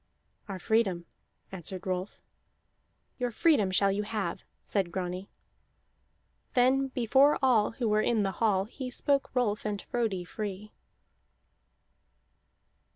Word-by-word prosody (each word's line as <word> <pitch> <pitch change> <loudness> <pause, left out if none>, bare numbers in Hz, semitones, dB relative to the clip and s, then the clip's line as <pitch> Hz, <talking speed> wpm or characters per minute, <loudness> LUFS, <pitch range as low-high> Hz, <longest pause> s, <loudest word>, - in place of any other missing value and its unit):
"Our 195 - -4
freedom," 190 -3 +1 0.5
answered 185 0 -6
Rolf. 185 +1 -3 1.0
"Your 245 -1 0
freedom 240 - +3
shall 195 +1 +3
you 200 +1 -1
have," 210 -5 -3 0.2
said 190 -4 -1
Grani. 180 +1 -4 1.3
Then, 260 +2 +4
before 265 +3 +3
all 230 -6 +3
who 235 0 -2
were 215 0 +3
in 220 -1 +2
the 195 - 0
hall, 200 -4 +3
he 255 +4 -7
spoke 275 +2 +1
Rolf 215 -4 +1
and 210 -1 -2
Frodi 215 -7 -2
free. 205 +2 -6
210 Hz, 115 wpm, -29 LUFS, 190-245 Hz, 1.3 s, Then